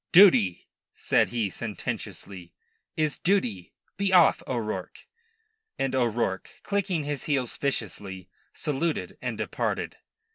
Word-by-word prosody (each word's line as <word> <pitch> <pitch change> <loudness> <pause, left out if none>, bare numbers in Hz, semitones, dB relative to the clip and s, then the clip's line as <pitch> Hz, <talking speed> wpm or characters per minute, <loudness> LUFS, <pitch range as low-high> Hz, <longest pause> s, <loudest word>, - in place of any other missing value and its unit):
"Duty," 125 - +6 0.3
said - - +3
he 115 -5 -1
sententiously, 95 -4 -6 0.4
"is 155 -4 0
duty. 125 - +1 0.3
Be 200 0 +1
off, 180 -3 +6
O'Rourke." 110 -7 -4 0.7
And 135 -1 0
O'Rourke, 120 -6 0
clicking 195 -5 0
his 145 -2 -3
heels 135 -5 0
viciously, 100 -8 -3 0.2
saluted 155 +2 -2
and - - -3
departed. - - -2
125 Hz, 105 wpm, -27 LUFS, 100-160 Hz, 0.7 s, Duty